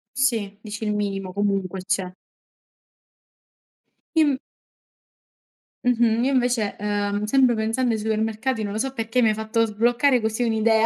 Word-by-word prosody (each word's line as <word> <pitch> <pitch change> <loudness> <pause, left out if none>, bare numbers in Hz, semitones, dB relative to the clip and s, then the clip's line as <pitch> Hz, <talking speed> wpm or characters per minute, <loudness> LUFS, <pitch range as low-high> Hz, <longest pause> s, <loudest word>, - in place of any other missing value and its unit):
Sì, 230 -7 0
dici 210 0 -7
il 210 -1 0
minimo 195 -2 -3
comunque 195 -2 -1
c'è. 185 -1 -1 2.0
Im 290 -4 +3 1.5
Mh-mh 235 -1 +3
io 275 - +2
invece, 245 -5 +1
ehm, 205 0 -1
sempre 255 +1 +4
pensando 225 +3 0
ai 220 - -1
supermercati, 220 +2 -1
non 200 - -3
lo 215 - -3
so 265 +2 -2
perché 230 +1 0
mi 225 - +4
hai - - +2
fatto 220 +1 0
sbloccare 240 +4 +2
così 220 +2 -1
un'idea. 225 0 +3
220 Hz, 140 wpm, -23 LUFS, 205-245 Hz, 2.0 s, sempre